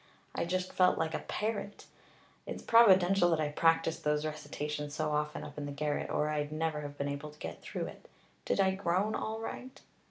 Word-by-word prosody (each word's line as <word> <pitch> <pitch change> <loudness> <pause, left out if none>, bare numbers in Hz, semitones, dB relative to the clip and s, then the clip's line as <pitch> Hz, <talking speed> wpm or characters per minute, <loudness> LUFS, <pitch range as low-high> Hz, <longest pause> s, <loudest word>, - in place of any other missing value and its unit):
I - - -1
just 185 +1 -2
felt 185 -1 +4
like 160 0 -1
a - - -1
parrot. 210 -1 -3 0.6
It's - - -5
providential 195 -5 +6
that 165 -2 +2
I 150 -1 +1
practiced 165 +1 +2
those 150 0 +1
recitations 150 -1 -4
so 155 -1 -1
often 150 0 -1
up - - -8
in 145 - -4
the - - -5
garret, 145 +1 -2
or 150 - +1
I'd 150 -1 -1
never 155 -1 -1
have 145 -1 -7
been 140 - -1
able 140 +1 -4
to 150 - -16
get - - -7
through. - - -4 0.6
Did - - 0
I 190 -1 +4
groan 190 +2 0
all 220 0 -3
right?" 255 +3 -7
155 Hz, 195 wpm, -32 LUFS, 150-185 Hz, 0.6 s, providential